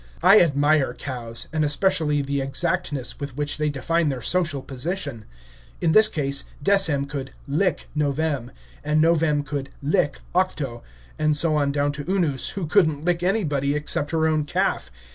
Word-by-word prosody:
I 195 +4 +8
admire 145 -4 +2
cows, 120 -4 -6
and 155 -1 +1
especially 150 -1 +1
the 140 0 -2
exactness 145 0 -2
with 140 -2 -6
which 145 0 -2
they 150 0 +1
define 160 +3 0
their 130 -4 -4
social 155 -5 +1
position. 140 - -4 0.5
In 165 - +1
this 215 +4 +6
case, 140 -6 -1 0.2
Decem 165 -8 +2
could 140 -1 -6
"lick" 160 +4 0
Novem, 145 -3 -1 0.3
and 150 +1 +1
Novem 155 -2 +3
could 140 -2 -4
"lick" 145 -1 0 0.2
Octo, 150 -10 -1 0.4
and 155 -1 +3
so 155 0 +3
on 145 -2 +1
down 145 0 0
to 145 +4 -5
Unus, 165 -9 +1
who 190 - -1
could 170 +1 +4
n't 150 0 -7
lick 175 -1 +1
anybody, 150 -8 0
except 150 0 0
her 160 0 +1
own 155 -1 +2
calf. - - -1
150 Hz, 160 wpm, -23 LUFS, 140-165 Hz, 0.5 s, I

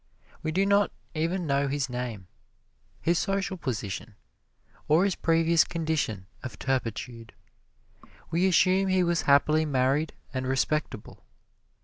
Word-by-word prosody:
We 155 - -2
do 190 +4 +2
not 200 +1 +3 0.2
even 170 +3 -1
know 140 -1 +1
his 140 -1 -1
name, 125 -6 -5 0.8
his 170 +1 +2
social 195 -1 -1
position, 115 - -5 0.7
or 160 +4 +4
his 200 - +1
previous 165 0 +3
condition 155 - -2 0.2
of 120 -6 -7
turpitude. 120 -3 -3 1.0
We 175 +3 +2
assume 190 +1 +3
he 185 -1 +3
was 170 -1 +1
happily 150 +3 +4
married 140 +1 +1 0.2
and 130 -1 -2
respectable. 135 -3 -2
155 Hz, 120 wpm, -27 LUFS, 130-175 Hz, 1.0 s, or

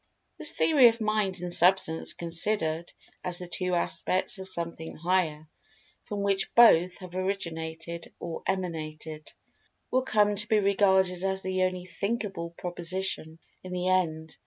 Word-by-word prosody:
This - - +1
theory 285 -6 +6
of 230 0 +2
Mind 215 -4 0
and 175 -1 -4
Substance 175 -2 +2
considered 170 -1 -2 0.3
as 180 -1 -1
the 180 - -6
two 180 +1 -1
aspects 185 +3 0
of 190 - -5
Something 170 -2 -5
Higher, 165 -3 0 0.6
from 205 -1 -3
which 200 -1 0
both 180 -7 +7
have 185 -2 -10
originated 170 -3 -4
or 170 -1 -5
emanated, 160 -4 -4 0.6
will 255 - +3
come 210 -5 +2
to 210 +2 -4
be 215 - +3
regarded 190 -2 +3
as 190 0 -1
the 185 0 -1
only 185 -1 0
"thinkable" 200 -2 -3
proposition, 175 -2 -4 0.3
in 185 0 -7
the 180 0 0
end. 160 -4 0
185 Hz, 140 wpm, -28 LUFS, 170-195 Hz, 0.6 s, both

